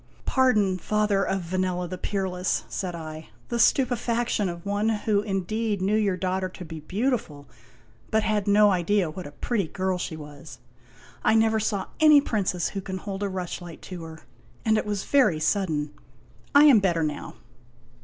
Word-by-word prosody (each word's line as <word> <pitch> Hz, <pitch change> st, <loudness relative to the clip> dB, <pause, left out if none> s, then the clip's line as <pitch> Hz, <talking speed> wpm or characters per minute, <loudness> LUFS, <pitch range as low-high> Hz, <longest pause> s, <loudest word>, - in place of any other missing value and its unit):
" -, -, -29 dB
Pardon, 210 Hz, -8 st, +2 dB
father 210 Hz, +1 st, +1 dB
of 195 Hz, -1 st, -1 dB
Vanella 180 Hz, 0 st, -1 dB
the 185 Hz, -, -5 dB
peerless," 185 Hz, -2 st, -1 dB
said 180 Hz, -3 st, -4 dB
I, 155 Hz, -1 st, -8 dB
" -, -, -31 dB
the 235 Hz, -, -1 dB
stupefaction 240 Hz, -4 st, +2 dB
of 170 Hz, +1 st, -8 dB
one 205 Hz, +2 st, 0 dB
who 210 Hz, -1 st, +1 dB
indeed 210 Hz, +1 st, -2 dB
knew 195 Hz, +3 st, +1 dB
your 205 Hz, -4 st, +1 dB
daughter 185 Hz, 0 st, -1 dB
to 185 Hz, 0 st, -10 dB
be 160 Hz, 0 st, -7 dB
beautiful, 185 Hz, -, -2 dB, 0.6 s
but 220 Hz, 0 st, +2 dB
had 210 Hz, -2 st, 0 dB
no 205 Hz, 0 st, +5 dB
idea 185 Hz, -1 st, +1 dB
what 180 Hz, -1 st, -7 dB
a -, -, -10 dB
pretty 200 Hz, +5 st, -2 dB
girl 185 Hz, +1 st, -2 dB
she 160 Hz, -2 st, -4 dB
was. 150 Hz, +1 st, -11 dB, 0.7 s
I 220 Hz, -, +4 dB
never 220 Hz, 0 st, +3 dB
saw 210 Hz, -2 st, -1 dB
any 305 Hz, -2 st, +8 dB
princess 200 Hz, -, -1 dB
who 195 Hz, -, -5 dB
can 190 Hz, 0 st, -5 dB
hold 195 Hz, +1 st, -6 dB
a 200 Hz, -, -1 dB
rushlight 175 Hz, -2 st, -6 dB
to 175 Hz, -, -6 dB
her; 160 Hz, 0 st, -10 dB, 0.4 s
and 220 Hz, -1 st, +4 dB
it 215 Hz, -, -1 dB
was 205 Hz, -2 st, -2 dB
very 255 Hz, -, +3 dB
sudden. 155 Hz, -4 st, 0 dB, 0.6 s
I 285 Hz, -, +9 dB
am 280 Hz, -7 st, +8 dB
better 175 Hz, -4 st, +1 dB
now." 150 Hz, -1 st, -4 dB
195 Hz, 175 wpm, -25 LUFS, 175-215 Hz, 0.7 s, I